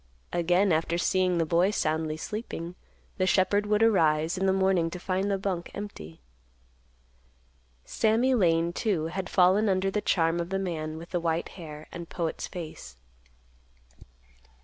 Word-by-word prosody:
Again, 175 +3 +2
after 165 +1 +1
seeing 185 0 +1
the 165 - +2
boy 170 +4 +3
soundly 155 -5 -1
sleeping, 175 -2 -5 0.5
the 185 - +2
shepherd 200 +2 +2
would 210 +1 +3
arise 160 -6 +3
in 190 +1 0
the - - +4
morning 190 -3 +2
to 180 - -7
find 190 +2 -1
the 200 - +1
bunk 190 -3 -3
empty. 80 - -8 1.6
Sammy 230 +4 +2
Lane, 170 -6 +2
too, 185 -8 0
had 190 -1 -3
fallen 190 +3 +4
under 190 0 +1
the 210 - -1
charm 165 -3 +1
of 170 0 -3
the 195 - -1
man 160 -5 -3
with 165 +2 -10
the 175 - 0
white 165 0 -1
hair 155 -4 -10
and 170 -1 -8
poet's 165 -2 -3
face. 155 - -8
180 Hz, 150 wpm, -27 LUFS, 165-195 Hz, 1.6 s, the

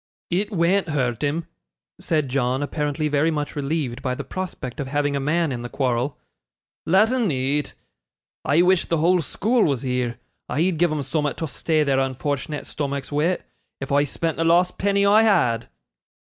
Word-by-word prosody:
'It 195 +5 0
wean't 185 0 +2
hurt 125 -6 -1
him,' 150 +3 -1 0.5
said 155 -4 0
John, 130 +1 0
apparently 150 +1 -1
very 150 +2 +2
much 150 -2 -3
relieved 140 -3 -2
by 125 -1 -1
the - - -5
prospect 165 -8 -6
of 140 - -3
having 145 +1 0
a - - 0
man 155 +3 +1
in 120 -2 -4
the 120 - -6
quarrel; 130 +1 -1 0.7
'let' 195 +7 +4
un 245 -6 +1
eat. 140 +1 -1 0.7
I 150 +6 +3
wish 185 0 +3
the 165 - 0
whole 175 +3 +3
school 225 - +1
was 140 -5 0
here. 125 -2 -1 0.3
I'd 165 +1 0
give'em 155 -4 +1
soom'at 150 -1 -1
to 160 - -3
stay 155 +1 0
their 135 -2 +2
unfort'nate 140 +3 -2
stomachs 140 -1 -4
wi', 155 +5 +1 0.4
if 135 - -6
I 145 +1 +4
spent 160 +3 -2
the 165 - +1
last 175 +2 +3
penny 200 0 +2
I 210 +2 +6
had! 170 - +2
150 Hz, 175 wpm, -23 LUFS, 135-170 Hz, 0.7 s, I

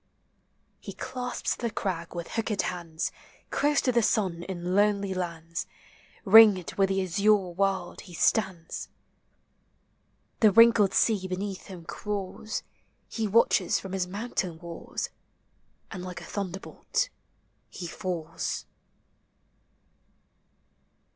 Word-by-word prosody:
He - - -8
clasps 250 -1 -3
the 235 - -2
crag 180 -6 -3
with 170 -1 -5
hooked 220 -3 -1
hands; 170 -2 -3 0.4
Close 290 0 +2
to 255 - +2
the 240 -1 +3
sun 190 -6 +1
in 180 0 -4
lonely 200 -1 +2
lands. 170 -2 -4 0.6
Ringed 205 -3 +7
with 195 -1 +2
the 195 0 +1
azure 200 +4 +4 0.2
world, 190 -1 -1
he 175 -3 -11
stands. 185 -4 0 1.5
The 215 -2 +6
wrinkled 230 -2 +6
sea 205 -5 +2
beneath 190 +1 -4
him 180 -4 -9
crawls; 210 +3 -4 0.4
He 225 -2 -2
watches 205 -3 +3
from 190 - -8
his 185 -1 -1
mountain 190 -4 -3
walls. 170 0 -6 0.8
And 185 -3 -6
like 180 -1 -6
a - - -9
thunderbolt 200 - -3 0.6
he 180 - -7
falls. 170 -2 -4
190 Hz, 110 wpm, -28 LUFS, 175-210 Hz, 1.5 s, Ringed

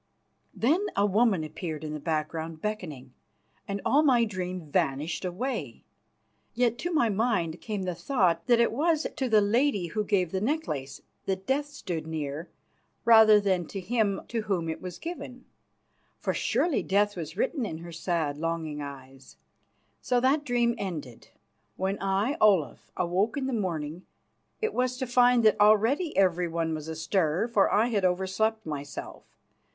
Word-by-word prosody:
Then 325 - +2
a 200 - +3
woman 205 -3 +2
appeared 155 0 -5
in 155 -1 -4
the 150 - -4
background 160 +1 -3
beckoning, 155 -11 -5 0.5
and 200 0 -3
all 290 - +4
my 250 -6 +4
dream 185 -4 -4
vanished 150 +2 0
away. 180 - -4 0.7
Yet 240 -1 +1
to 350 - -2
my 295 -8 +3
mind 195 -6 0
came 210 -3 -3
the 180 -1 -2
thought 175 -5 0
that 240 -1 +5
it 235 - +3
was 315 +5 +1
to 260 -2 -1
the 215 -2 +5
lady 210 -1 +2
who 215 +5 -1
gave 185 -4 +1
the 190 - -1
necklace 200 - -2 0.3
that 190 0 -2
Death 285 +2 0
stood 175 - -5
near, 155 0 -4 0.6
rather 220 -2 +8
than 190 -5 0
to 195 - -6
him 205 0 0
to 230 -1 -1
whom 185 -6 -1
it 160 - -4
was 180 -1 -7
given. 315 -7 -7 0.7
For - - -1
surely 340 -5 +1
death 205 +1 +1
was 160 -3 -6
written 265 -1 0
in 180 -8 -4
her 170 +1 -9
sad 165 -3 -2
and - - -9
longing 165 -3 -2
eyes. 135 -2 -10 0.6
So 245 - +1
that 270 +4 +2
dream 240 -3 +1
ended. 155 - -6 0.5
When 190 +2 -2
I, 195 +8 0
Olaf, 185 - +2
awoke 185 +8 0
in 275 - -1
the 265 - -2
morning, 170 -5 -3 0.5
it 440 0 0
was 250 0 0
to 260 - -2
find 245 -1 +4
that 215 - +4
already 225 - +3
everyone 170 -3 +1
was 155 0 -5
astir, 160 +3 0
for 215 -4 +3
I 220 +4 +3
had 205 -5 0
overslept 190 +5 0
myself. 145 -2 -6
195 Hz, 160 wpm, -28 LUFS, 165-235 Hz, 0.7 s, rather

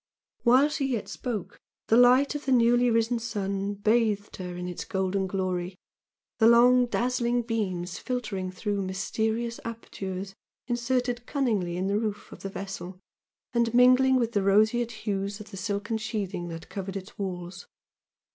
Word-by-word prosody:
While 255 +4 +5
she 285 -2 -1
yet 240 -6 -2
spoke, 235 -6 -5 0.3
the 225 - +3
light 250 +4 +6
of 295 0 -5
the - - +2
newly 245 0 +4
risen 230 +1 +2
sun 200 -3 -2
bathed 210 0 +1
her 180 -1 -6
in 180 0 -4
its 180 - -5
golden 190 -1 -1
glory, 185 -1 -2 0.6
the 225 - +6
long 245 +1 +6
dazzling 240 0 0
beams 185 -6 -2
filtering 210 -7 -3
through 200 +2 -2
mysterious 220 +5 -2
apertures 195 -4 -6 0.3
inserted 245 0 -1
cunningly 210 - 0
in 185 - -1
the 200 +2 +1
roof 210 -2 -4
of - - -10
the 195 - -5
vessel 190 -2 -7 0.5
and 235 -1 +1
mingling 255 +1 +6
with 235 -3 +1
the 205 - +1
roseate 215 +4 +3
hues 200 -1 -2
of 210 0 -11
the 195 - -8
silken 205 +2 -2
sheathing 200 -5 -3
that 165 -1 -7
covered 195 0 -5
its 195 +2 -10
walls. 180 -1 -5
215 Hz, 155 wpm, -27 LUFS, 195-240 Hz, 0.6 s, light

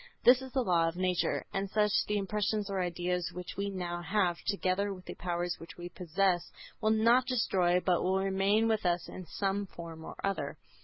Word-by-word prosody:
This 250 +1 +7
is 260 -1 -8
the 260 -1 +1
law 170 -5 +3
of 165 - -2
nature. 185 -1 0
As 195 0 -1
such, 210 -1 +3 0.2
the 210 - +1
impressions 210 0 -1
or 190 -1 0
ideas 180 0 -1
which 180 0 -7
we 200 0 -2
now 175 -3 -3
have, 185 -2 +1
together 200 0 +1
with 185 -2 -8
the - - -6
powers 175 0 -2
which 165 - -11
we 175 0 -6
possess, 180 0 0 0.3
will 215 - +2
not 230 +3 +4
be 255 - 0
destroyed 180 -6 +2
but 180 -2 +3
will 190 +1 +2
remain 195 +3 +2
with 220 -1 +1
us 175 -1 +1
in 185 -2 -8
some 200 0 -1
form 165 -2 -9
or - - -8
other. 190 -8 -2
190 Hz, 205 wpm, -31 LUFS, 175-205 Hz, 0.3 s, This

